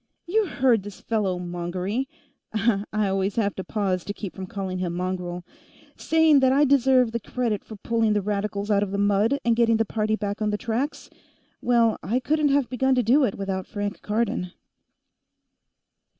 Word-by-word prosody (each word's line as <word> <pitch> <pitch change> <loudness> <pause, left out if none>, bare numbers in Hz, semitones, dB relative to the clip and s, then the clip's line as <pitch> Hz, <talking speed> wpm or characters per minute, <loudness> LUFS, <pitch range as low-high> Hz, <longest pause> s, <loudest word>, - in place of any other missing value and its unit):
You 420 +3 +1
heard 255 - +2
this 205 0 -10
fellow 205 -5 -1
Mongery 180 +7 -3 0.4
I 215 -1 +1 0.3
always 195 +1 -1
have 205 -3 +1
to 190 - -6
pause 190 -5 -1
to 205 - -5
keep 200 -4 -6
from 190 -1 -7
calling 190 -1 -4
him 175 -2 -2
Mongrel 180 -1 -3 0.5
saying 320 -3 +4
that 260 -1 +4
I 285 +2 +4
deserved 260 -3 +4
the 235 - -1
credit 230 -2 -2
for 220 - -10
pulling 225 +1 0
the 205 - +1
Radicals 205 0 -2
out 200 -1 +3
of 205 - -1
the 200 - -3
mud 205 +6 +2
and 235 -1 +3
getting 230 -1 +3
the 225 - +1
party 215 +1 0
back 205 0 -4
on 210 - +1
the 210 - -1
tracks. 245 +6 -3 0.5
Well, 235 -2 +3
I 220 +10 0
couldn't 300 +3 +1
have 280 -2 +2
begun 265 +1 +1
to 250 - +2
do 260 +7 +4
it 200 - -2
without 190 -1 -3
Frank 205 -1 -4
Cardon." 210 -4 -1
210 Hz, 180 wpm, -25 LUFS, 195-245 Hz, 0.5 s, saying